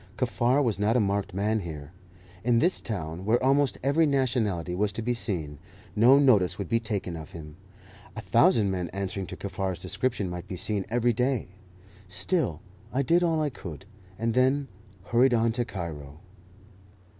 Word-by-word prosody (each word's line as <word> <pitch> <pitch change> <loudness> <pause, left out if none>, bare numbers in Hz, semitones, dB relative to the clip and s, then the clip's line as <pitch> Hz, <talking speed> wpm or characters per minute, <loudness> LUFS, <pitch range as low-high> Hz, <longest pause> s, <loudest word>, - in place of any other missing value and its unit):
Kaffar 125 +2 +2
was 115 -6 0
not 110 +4 +2
a - - +4
marked 100 -1 0
man 105 +4 0
here. 80 -5 -7 0.5
In 120 0 +3
this 175 +9 +2
town, 85 -5 -5
where 115 +5 +2
almost 135 +1 +3
every 150 +4 +3
nationality 120 - 0
was 100 +3 0
to 115 - -4
be 120 +2 0
seen, 80 -11 -4 0.4
no 120 +6 +7
notice 100 -10 +4
would 100 - -4
be 115 - +2
taken 105 -6 -3
of 80 +3 -9
him. 75 -3 -9 0.6
A - - -5
thousand 110 0 +3
men 90 -3 -2
answering 95 0 -3
to - - -6
Kaffar's 95 -2 -3
description 120 -6 -2
might 90 +1 -6
be 95 - -5
seen 100 +1 -2
every 120 +1 +2
day. 125 -2 0 0.6
Still 95 - -1 0.3
I 135 +2 0
did 170 +7 +3
all 165 -3 +1
I 145 - -1
could, 85 - -9 0.3
and 115 +1 -1
then 130 +2 +2 0.3
hurried 120 +3 +3
on 115 0 +2
to 120 +1 -1
Cairo. 75 - -7
110 Hz, 170 wpm, -27 LUFS, 90-125 Hz, 0.6 s, no